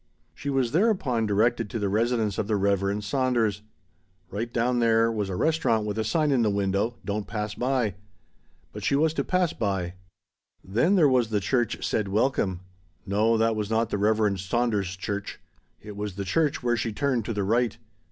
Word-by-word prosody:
She 140 +12 -6
was 135 -4 +1
thereupon 155 - +1
directed 115 +2 +1
to 115 - -3
the 105 -2 -1
residence 110 0 0
of 100 - -1
the 110 - +1
Reverend 100 +1 0
Saunders. 115 -4 0 0.7
Right 115 +4 -3
down 120 +1 +1
there 115 -1 +3
was 105 -3 -2
a 95 - -3
restaurant 115 - +1
with 105 +1 -3
a - - +1
sign 150 +7 +1
in 130 -3 +3
the 110 - +2
window 100 +3 0
"Don't 100 +1 -3
Pass 105 -1 -3
By." 125 -5 0 0.8
But - - -7
she - - +2
was 155 +2 +2
to - - -1
pass 180 -2 +1
by. 95 -5 -2 0.7
Then 120 - +2
there 165 -6 +5
was 125 -4 +2
the 105 -2 +1
church 115 +5 -1
said 105 -2 0
"Welcome." 100 -3 0 0.4
No, 105 +3 +2
that 115 0 +2
was 105 -1 -3
not 115 0 0
the 100 - -1
Reverend 105 -2 +2
Saunders' 100 -2 -1
church. 100 +1 -5 0.4
It 105 -1 -8
was 105 -2 -5
the 100 0 -4
church 145 - 0
where 120 -1 +2
she 115 -1 -2
turned 130 0 0
to 115 - -2
the 105 -1 -1
right. 115 +3 +1
110 Hz, 190 wpm, -26 LUFS, 100-120 Hz, 0.8 s, there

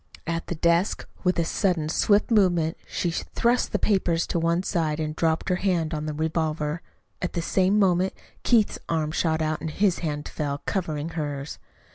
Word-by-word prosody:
At 165 0 -3
the 175 - -3
desk, 170 +4 +1 0.2
with 180 -1 +2
a 170 - +2
sudden 175 -3 0
swift 205 +7 +2
movement, 175 -6 +3
she 175 - -1
thrust 235 +8 0
the - - +1
papers 175 -5 +1
to 170 - -1
one 170 +2 +1
side 160 -5 0
and 155 -1 -2
dropped 160 -1 0
her 180 - +2
hand 175 -4 0
on 155 0 -3
the 155 - -2
revolver. 155 0 -1 0.4
At 180 - -2
the 170 - -1
same 190 +3 +2
moment 185 -2 +3 0.3
Keith's 225 -4 +3
arm 155 -2 0
shot 160 -1 +1
out 155 -1 -1
and 160 - -3
his 190 +3 +1
hand 150 -3 -3
fell, 145 -2 -3
covering 160 -5 -2
hers. 145 -3 -4
165 Hz, 180 wpm, -25 LUFS, 155-185 Hz, 0.4 s, movement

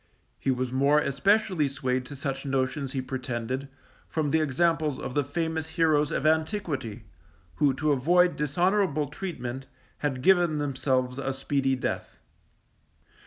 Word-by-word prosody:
He - - -2
was 130 -1 0
more 140 +3 +3
especially 185 +3 +2
swayed 130 -2 -2
to 145 - -8
such 135 -1 -3
notions 135 0 -1
he 130 -2 -2
pretended, 130 0 -3 0.4
from 155 -3 -1
the 160 - +3
examples 155 0 +1
of 130 - -5
the 145 - +2
famous 160 +2 -2
heroes 155 -3 +3
of - - -2
antiquity, 155 - 0 0.5
who 140 -3 +3
to 150 +2 +1
avoid 175 +6 +3
dishonourable 155 0 +1
treatment, 135 -8 -5 0.3
had 135 -4 -2
given 175 -4 +4
themselves 130 -2 0
a 135 0 -1
speedy 135 0 0
death. 130 - -4
140 Hz, 135 wpm, -27 LUFS, 130-160 Hz, 0.5 s, given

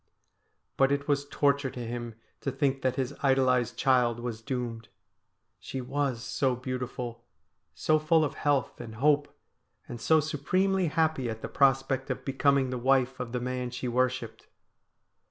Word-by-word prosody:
But 135 0 +4
it 140 0 -1
was 145 -1 0
torture 140 -1 +2
to 125 -1 -6
him 120 -1 -5 0.2
to 135 - -2
think 135 0 0
that 130 -1 0
his 130 -2 -2
idolised 130 -3 +2
child 125 -4 +3
was 120 -2 -5
doomed. 115 -3 -4 0.7
She 135 - -6
was 130 -2 -2
so 130 -1 0
beautiful, 125 -1 -5 0.5
so 155 0 +2
full 155 +1 +3
of - - -3
health 145 -4 0
and 115 -2 -8
hope; 145 +4 +3 0.6
and 120 -1 -7
so 160 +6 +4
supremely 185 +5 +1
happy 155 -5 +1
at 110 0 -6
the - - -2
prospect 135 -1 +2
of 130 - -4
becoming 135 -1 +2
the 125 - -3
wife 130 0 +2
of 125 -2 -4
the 125 - -1
man 125 0 -3
she 125 +1 -5
worshipped. 125 -1 -1
130 Hz, 155 wpm, -28 LUFS, 125-140 Hz, 0.7 s, But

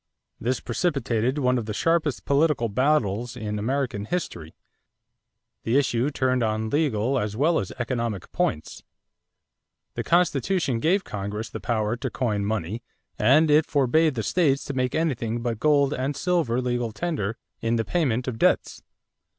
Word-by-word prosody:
This 125 +3 -1
precipitated 130 -3 -1
one 125 -3 +2
of 110 - -6
the 105 - -3
sharpest 165 -3 0
political 140 -4 +2
battles 120 -2 +1
in 105 -2 -3
American 125 -2 -1
history. 95 - -4 1.1
The 115 +4 +1
issue 130 -1 +1
turned 130 -3 0
on 110 0 -1
legal 135 -4 +1
as 105 -1 -3
well 160 +5 +3
as 95 - -4
economic 120 -5 -3
points. 75 - -2 1.1
The - - -3
Constitution 170 -5 +1
gave 185 - +2
Congress 105 +2 -5
the - - -5
power 110 -2 -1
to - - -3
coin 105 -6 -1
money 105 +1 -2 0.4
and 150 +8 +5
it 155 +1 +4
forbade 150 +2 +2
the 110 - -2
states 145 - +1
to 140 - -4
make 130 -1 -1
anything 120 -8 -1
but 115 -3 -2
gold 145 -1 +3
and 135 +3 -2
silver 160 -7 +1
legal 120 -2 -1
tender 115 - -3 0.2
in 115 +1 0
the 115 -1 0
payment 130 -8 0
of 115 -3 -4
debts. - - +1
125 Hz, 150 wpm, -25 LUFS, 110-145 Hz, 1.1 s, and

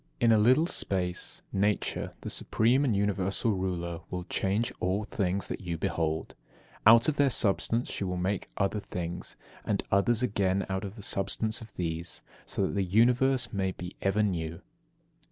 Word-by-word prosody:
25. - - -34
In 120 -1 +5
a 110 -1 +5
little 130 +8 +5
space 90 - -2
Nature, 100 +1 0
the - - -5
supreme 120 +5 +2
and 120 -7 +2
universal 100 +2 0
ruler, 90 -3 -2
will 90 -1 -4
change 100 +5 0
all 95 +4 0
things 100 -2 -1
that - - -5
you 85 -3 -3
behold; 80 0 -2 0.5
out 115 +1 +8
of 150 -2 +1
their 140 -1 +4
substance 115 +1 +1
she - - -2
will 90 -1 -2
make 95 +2 -2
other 100 +1 0
things, 90 -3 -5 0.3
and - - 0
others 110 +5 +3
again 100 -4 +1
out 95 +1 -2
of 100 0 -6
the 105 - -9
substance 110 +4 0
of 110 -1 -11
these, 85 -1 -3 0.2
so - - -1
that - - -1
the 100 -1 +1
Universe 120 +5 +3
may 95 -2 0
be 90 +1 -8
ever 100 +2 +2
new. 85 -5 -2
100 Hz, 170 wpm, -29 LUFS, 90-110 Hz, 0.5 s, out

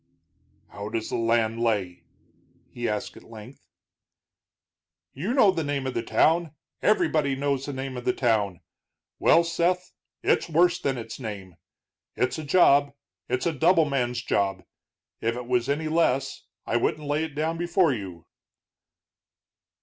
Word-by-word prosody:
"How 100 +1 -7
does 110 0 -3
the - - -1
land 115 -1 +1
lay?" 100 -6 -1 0.7
he 120 -1 -3
asked 105 -1 -3
at - - -13
length. 115 +2 -12 1.5
"You 175 - -3
know 250 -7 +5
the 165 -3 -2
name 145 -2 -2
of 130 - -2
the 115 - -1
town, 160 +6 +2 0.3
everybody 155 -9 +2
knows 140 0 -1
the 145 - -4
name 130 0 -5
of 125 - -7
the - - +3
town. 105 -8 0 0.6
Well, 170 - +5
Seth, 175 +2 -1 0.3
it's - - +1
worse 175 +2 +3
than 135 -2 -1
its 115 0 -7
name. 100 -7 -7 0.6
It's 125 +5 -1
a - - -5
job; 145 -3 +4 0.4
it's 125 +1 -1
a 170 - +1
double 165 +2 +4
man's 125 -4 -1
job. 95 -4 0 0.6
If 115 +1 -1
it 125 0 -6
was 125 0 0
any 155 +3 -1
less, 145 -4 0 0.2
I 120 - 0
wouldn't 150 +5 -1
lay 145 +2 0
it 160 -3 -6
down 160 +2 -1
before 175 -3 +2
you." 95 -7 -7
135 Hz, 150 wpm, -26 LUFS, 115-160 Hz, 1.5 s, know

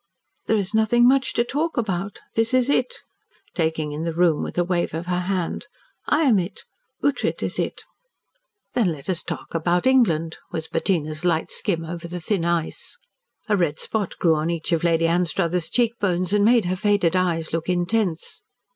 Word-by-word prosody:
"There 220 - +3
is 200 0 -2
nothing 230 +2 +4
much 265 +1 +3
to 235 - +2
talk 295 +6 -2
about. 200 -3 -2
This 225 +2 +2
is 255 +1 +3
it 250 -3 +2 0.3
" - - -36
taking 160 -3 -1
in 150 +1 -4
the 165 -1 -3
room 170 -3 +3
with - - -5
a 175 - +3
wave 175 -2 -1
of 165 +2 -4
her 180 0 -1
hand. 180 -1 -2 0.4
"I 305 +2 +3
am 240 -9 +4
it. 180 +3 -5 0.4
Ughtred 285 -1 0
is - - -3
it." - - -3 0.9
"Then 220 -8 +2
let 145 +4 -4
us 175 - -1
talk - - -6
about 175 +2 +1
England," 170 -12 +3
was 160 -1 -4
Bettina's 155 -2 -1
light 165 -2 +1
skim 165 -5 -1
over 170 +1 -6
the 175 +1 -5
thin 175 0 -1
ice. 170 -2 -2 0.5
A 210 - +3
red 165 -5 0
spot 210 -4 -3
grew 165 -2 +3
on 155 +1 0
each 170 0 -2
of 165 -1 +1
Lady 165 -1 +3
Anstruthers' 170 0 +1
cheek 235 +3 +2
bones 185 -1 0
and 205 -1 +4
made 230 -1 +4
her 180 +1 0
faded 200 -3 +2
eyes 170 -4 0
look 165 +1 -2
intense. 180 0 -1
180 Hz, 190 wpm, -23 LUFS, 165-210 Hz, 0.9 s, nothing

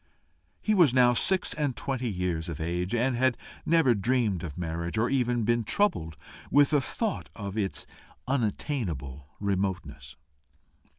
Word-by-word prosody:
He 215 - +1
was 165 - +5
now 125 -1 +6
six 185 +9 +1
and 145 -5 -1
twenty 130 -2 -2
years 90 -4 -2
of 80 -1 -5
age, 90 +6 -1
and 125 +2 +1
had 125 -1 +2 0.3
never 160 -6 +5
dreamed 110 -3 +1
of 75 -5 -6
marriage, 85 +2 -3
or 115 +4 +1
even 120 -3 +1
been 120 +1 +2
troubled 100 - 0 0.3
with 145 +1 +4
a 145 - +4
thought 220 - -3
of 100 -2 -6
its 100 -3 -2 0.4
unattainable 100 - -2
remoteness. 90 -8 -2
110 Hz, 140 wpm, -28 LUFS, 90-130 Hz, 0.4 s, now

